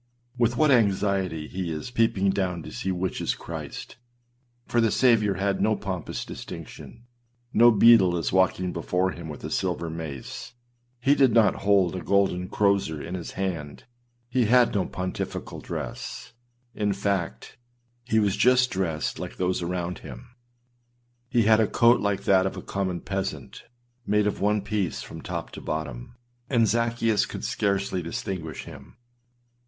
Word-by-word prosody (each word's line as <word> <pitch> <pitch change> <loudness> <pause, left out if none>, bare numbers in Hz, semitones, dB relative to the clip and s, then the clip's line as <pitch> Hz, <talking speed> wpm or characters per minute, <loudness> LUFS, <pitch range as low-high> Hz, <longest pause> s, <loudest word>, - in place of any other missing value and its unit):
With 120 -1 +1
what 155 -2 +4
anxiety 95 - +1
he 90 -2 -4
is 80 +10 -5
peeping 105 -5 +2
down 90 -4 -2
to - - -9
see 80 +10 -3
which 90 0 -2
is - - 0
Christ - - -8 0.7
â - - -18
for 120 - +3
the 115 - +3
Saviour 105 -5 +3
had 100 +1 0
no 110 0 +3
pompous 95 -6 -4
distinction; 115 - -9 0.5
no 120 +2 +7
beadle 105 -5 +6
is 85 - -2
walking 95 -1 +2
before 90 +2 0
him 85 -3 -8
with 75 - -8
a - - -5
silver 85 -3 -1
mace; 80 - -7 0.5
he 135 +3 +4
did 135 -5 +4
not 115 -2 +4
hold 95 -3 +4
a 90 - -4
golden 90 0 +1
crozier 100 -6 +1
in 85 +5 -6
his 90 -2 -5
hand: 85 -7 -4 0.4
he 125 -1 +1
had 120 +2 +4
no 100 -3 0
pontifical 90 0 -5
dress; - - -6 0.4
in 105 -2 0
fact, 95 - -3 0.5
he 115 -2 0
was 105 -2 +2
just 125 0 +4
dressed 85 -5 -2
like - - -6
those 90 0 0
around 90 0 -3
him. 125 - -10 1.0
He 120 -3 +3
had 110 +1 +5
a 110 - +3
coat 120 +1 +4
like 100 -1 -1
that 95 -1 +4
of - - -5
a - - -7
common 95 -3 -2
peasant, 95 -1 -5 0.4
made 105 0 +3
of 105 - -1
one 105 0 +2
piece 100 -3 -2
from - - -9
top - - -5
to - - -9
bottom; 75 - -5 0.3
and 120 -4 +4
Zaccheus 115 -1 +1
could - - -6
scarcely 100 -2 0
distinguish 85 -2 -5
him. - - -13
100 Hz, 160 wpm, -26 LUFS, 90-110 Hz, 1.0 s, no